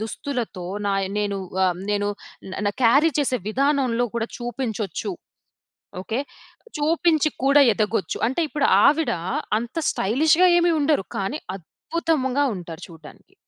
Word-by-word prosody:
దుస్తులతో, 225 Hz, -, -4 dB, 0.2 s
నాయ్ 195 Hz, -1 st, 0 dB
నేను 205 Hz, -1 st, -1 dB, 0.3 s
ఆహ్, 180 Hz, -1 st, +1 dB
నేను 205 Hz, 0 st, 0 dB, 0.6 s
న 205 Hz, -, +3 dB
క్యారీ 280 Hz, +8 st, +5 dB
చేసే 260 Hz, -3 st, +1 dB
విధానంలో 260 Hz, -1 st, +1 dB
కూడా, 230 Hz, 0 st, -2 dB
చూపించొచ్చు. 240 Hz, -, -4 dB, 0.9 s
ఓకే, 225 Hz, +5 st, -3 dB, 0.6 s
చూపించి 315 Hz, 0 st, +2 dB
కూడా 280 Hz, +2 st, +6 dB
ఎదగొచ్చు. 210 Hz, -4 st, -1 dB
అంటే, 265 Hz, +7 st, -2 dB
ఇప్పుడు 290 Hz, -1 st, +1 dB, 0.2 s
ఆవిడ 305 Hz, +3 st, +3 dB, 0.5 s
అంత 235 Hz, +6 st, -7 dB
స్టైలిష్‌గా 310 Hz, -, +3 dB
ఏమి 345 Hz, 0 st, +3 dB
ఉండరు 290 Hz, -9 st, +1 dB
కానీ, 230 Hz, +11 st, -3 dB, 0.2 s
అద్భుతంగా 285 Hz, -, -1 dB
ఉంటారు, 170 Hz, -3 st, -9 dB
చూడడానికి. 165 Hz, -, -15 dB
250 Hz, 115 wpm, -23 LUFS, 205-295 Hz, 0.9 s, కూడా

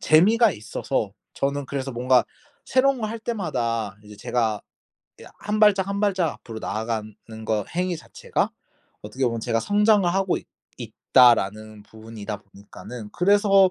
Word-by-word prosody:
재미가 215 Hz, +9 st, +5 dB
있어서 105 Hz, -2 st, -3 dB, 0.2 s
저는 140 Hz, 0 st, -1 dB
그래서 135 Hz, -1 st, -4 dB
뭔가 125 Hz, +1 st, +3 dB, 0.4 s
새로운 265 Hz, 0 st, +2 dB
거 215 Hz, -, -1 dB
할 225 Hz, +2 st, -5 dB
때마다 115 Hz, -, -2 dB
이제 105 Hz, 0 st, -12 dB
제가 110 Hz, -1 st, -1 dB, 0.6 s
이 -, -, -11 dB
1 210 Hz, +1 st, -2 dB
발짝 200 Hz, -3 st, +5 dB
1 200 Hz, 0 st, -2 dB
발짝 190 Hz, -6 st, +1 dB
앞으로 115 Hz, -1 st, -9 dB
나아가는 110 Hz, -1 st, -3 dB, 0.3 s
거 105 Hz, -2 st, 0 dB
행위 180 Hz, -1 st, 0 dB
자체가 -, -, -3 dB, 0.5 s
어떻게 105 Hz, +6 st, -3 dB
보면 115 Hz, -1 st, -2 dB
제가 115 Hz, 0 st, 0 dB
'성장을 205 Hz, -, +3 dB
하고 195 Hz, -1 st, +1 dB
있 -, -, -16 dB, 0.3 s
있다.'라는 110 Hz, -3 st, +2 dB
부분이다 110 Hz, -1 st, -8 dB
보니까는 105 Hz, +3 st, -11 dB
그래서 195 Hz, 0 st, +4 dB
130 Hz, 310 characters per minute, -24 LUFS, -, 0.6 s, 재미가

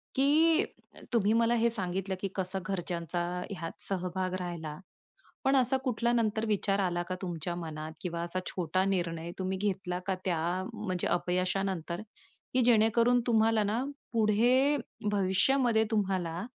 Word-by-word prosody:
की 315 Hz, +5 st, +4 dB, 0.5 s
तुम्ही 215 Hz, -2 st, +3 dB
मला 230 Hz, +1 st, +3 dB
हे 235 Hz, 0 st, +3 dB
सांगितलं 190 Hz, -3 st, -2 dB
की 195 Hz, -, 0 dB
कसं 190 Hz, 0 st, -2 dB
घरच्यांचा 175 Hz, -2 st, -2 dB, 0.3 s
ह्यात 170 Hz, -4 st, -6 dB
सहभाग 185 Hz, -1 st, -1 dB
राहिला, 165 Hz, -4 st, -5 dB, 0.7 s
पण 270 Hz, +1 st, +3 dB
असा 260 Hz, 0 st, +4 dB
कुठला 240 Hz, -2 st, +1 dB
नंतर 220 Hz, -1 st, +1 dB
विचार 200 Hz, -1 st, +1 dB
आला 175 Hz, -2 st, 0 dB
का 185 Hz, -, -1 dB
तुमच्या 175 Hz, -2 st, -3 dB
मनात 160 Hz, -2 st, -5 dB
किंवा 170 Hz, -3 st, -3 dB
असा 175 Hz, +2 st, -2 dB
छोटा 180 Hz, +1 st, 0 dB
निर्णय 170 Hz, -3 st, -1 dB
तुम्ही 190 Hz, 0 st, -1 dB
घेतला 185 Hz, -2 st, -2 dB
का 190 Hz, -, +1 dB
त्या 175 Hz, -4 st, +1 dB, 0.3 s
म्हणजे 190 Hz, -5 st, -2 dB
अपयशानंतर, 180 Hz, 0 st, -1 dB, 0.5 s
की 255 Hz, -, +3 dB
जेणेकरून 235 Hz, +1 st, +4 dB
तुम्हाला 225 Hz, -1 st, +3 dB
ना 215 Hz, +5 st, 0 dB, 0.3 s
पुढे 240 Hz, +6 st, +4 dB, 0.3 s
भविष्यामध्ये 220 Hz, +5 st, +3 dB
तुम्हाला, 190 Hz, -3 st, -1 dB
195 Hz, 135 wpm, -30 LUFS, 175-225 Hz, 0.7 s, की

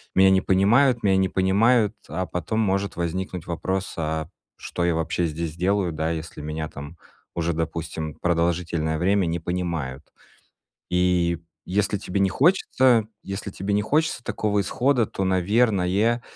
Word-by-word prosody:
"меня 95 Hz, 0 st, +6 dB
не 95 Hz, 0 st, +4 dB
понимают", 115 Hz, +8 st, +3 dB
"меня 95 Hz, -2 st, +3 dB
не 95 Hz, 0 st, +2 dB
понимают". 105 Hz, +4 st, +3 dB
А 95 Hz, +4 st, -3 dB
потом 90 Hz, +5 st, -3 dB
может 100 Hz, -1 st, 0 dB
возникнуть 90 Hz, 0 st, -3 dB
вопрос: 95 Hz, +3 st, -3 dB
"А 80 Hz, -1 st, -2 dB, 0.3 s
что 85 Hz, -, -4 dB
я 85 Hz, -2 st, +2 dB
вообще 80 Hz, +1 st, 0 dB
здесь 80 Hz, 0 st, -4 dB
делаю, 95 Hz, +1 st, +1 dB
да 80 Hz, 0 st, -2 dB
если 80 Hz, -1 st, -5 dB
меня 75 Hz, +1 st, -4 dB
там 75 Hz, +2 st, -10 dB, 0.4 s
уже, 85 Hz, 0 st, 0 dB
допустим, 80 Hz, -1 st, -4 dB
продолжительное 85 Hz, -2 st, 0 dB
время 95 Hz, +2 st, +2 dB
не 85 Hz, +1 st, -1 dB
понимают?" 80 Hz, -6 st, -3 dB, 0.9 s
И 90 Hz, -2 st, +2 dB, 0.3 s
если 105 Hz, +2 st, 0 dB
тебе 100 Hz, 0 st, -2 dB
не 95 Hz, -, +3 dB
хочется, 130 Hz, -, +3 dB, 0.2 s
если 100 Hz, +1 st, -5 dB
тебе 95 Hz, +2 st, -3 dB
не 105 Hz, -, +2 dB
хочется 150 Hz, +4 st, 0 dB
такого 105 Hz, -3 st, 0 dB
исхода, 125 Hz, +5 st, +1 dB
то, 95 Hz, -, -3 dB
наверное,- 100 Hz, +3 st, +2 dB
95 Hz, 145 wpm, -24 LUFS, 85-100 Hz, 0.9 s, меня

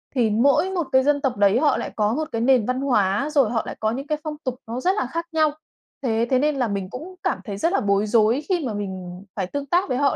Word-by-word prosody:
Thì 235 Hz, -3 st, +3 dB
mỗi 280 Hz, -, +3 dB
1 345 Hz, -7 st, -2 dB
cái 260 Hz, -1 st, +4 dB
dân 285 Hz, 0 st, +2 dB
tộc 255 Hz, -6 st, -1 dB
đấy 205 Hz, +4 st, +4 dB
họ 295 Hz, -, +3 dB
lại -, -, -4 dB
có 210 Hz, 0 st, +1 dB
1 310 Hz, +4 st, -2 dB
cái 230 Hz, -, -2 dB
nền 245 Hz, -3 st, +4 dB
văn 255 Hz, +1 st, -1 dB
hóa 210 Hz, -1 st, +1 dB
rồi 275 Hz, -8 st, +3 dB
họ 230 Hz, -2 st, 0 dB
lại -, -, -6 dB
có 220 Hz, 0 st, 0 dB
những 270 Hz, +5 st, -5 dB
cái 305 Hz, 0 st, 0 dB
phong 310 Hz, -1 st, -4 dB
tục 255 Hz, -2 st, -2 dB
nó 235 Hz, +2 st, -4 dB
rất 365 Hz, -, +3 dB
là 260 Hz, -, 0 dB
khác 335 Hz, +6 st, -4 dB
nhau. 310 Hz, -1 st, +3 dB, 0.5 s
Thế 230 Hz, -1 st, +1 dB
thế 260 Hz, -1 st, +3 dB
nên 300 Hz, 0 st, +1 dB
là 250 Hz, -3 st, 0 dB
mình 195 Hz, -2 st, -3 dB
cũng 340 Hz, +9 st, -8 dB
cảm -, -, 0 dB
thấy 200 Hz, -4 st, -6 dB
rất 335 Hz, -, 0 dB
là -, -, +3 dB
bối 200 Hz, 0 st, +1 dB
rối 225 Hz, +4 st, +3 dB
khi 345 Hz, -6 st, +1 dB
mà 230 Hz, -, -2 dB
mình 190 Hz, -3 st, -6 dB
phải 190 Hz, -3 st, -2 dB
tương 285 Hz, +7 st, -4 dB
tác 350 Hz, +2 st, +1 dB
với 250 Hz, -, 0 dB
họ, 280 Hz, 0 st, +2 dB
255 Hz, 285 wpm, -23 LUFS, 215-290 Hz, 0.5 s, cái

